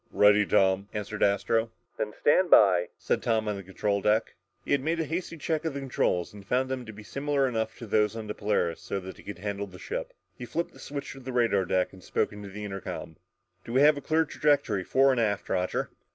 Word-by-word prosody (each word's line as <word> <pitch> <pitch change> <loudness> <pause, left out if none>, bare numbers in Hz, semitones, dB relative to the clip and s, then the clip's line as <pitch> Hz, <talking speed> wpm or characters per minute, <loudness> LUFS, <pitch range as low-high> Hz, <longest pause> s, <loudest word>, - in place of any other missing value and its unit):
"Ready, 105 0 +5
Tom," 95 +1 +3
answered 105 0 -4
Astro. 110 +3 +2 0.3
"Then 105 -1 -2
stand 180 +5 +4
by," 90 - +6
said - - -1
Tom 110 -2 +1
on 105 - 0
the 100 - -6
control 100 +2 -1
deck. 105 +3 +2 0.3
He - - -5
had 140 - +3
made 165 +4 -1
a 160 - 0
hasty 170 +2 -4
check 155 0 -1
of 160 -4 -2
the - - -2
controls 115 -10 0
and 100 -1 -11
found 130 +6 0
them 130 -3 -4
to - - -6
be 110 0 -11
similar 140 +3 0
enough 110 -3 -2
to 115 - -8
those 105 0 +2
on 110 -1 -5
the 105 - -4
Polaris 100 -6 -1
so 100 - -3
that 95 0 -9
he - - -13
could 100 -3 -7
handle 100 +1 -4
the 90 -1 -12
ship. - - -5 0.2
He 125 - -7
flipped 170 +6 -3
the - - -16
switch 140 -1 -6
to 135 - -10
the 130 0 -6
radar 115 -6 +2
deck 90 +1 0
and 95 -1 -14
spoke - - -1
into 105 -1 -8
the 105 +2 -7
intercom. 95 -5 -6 0.5
"Do 115 - -7
we 130 - +4
have 150 +1 +7
a 145 - -6
clear 160 +3 +2
trajectory 145 -10 +1
fore 135 +7 +4
and 125 -3 +1
aft, 100 -3 0
Roger?" 90 0 -1
110 Hz, 240 wpm, -28 LUFS, 100-135 Hz, 0.5 s, have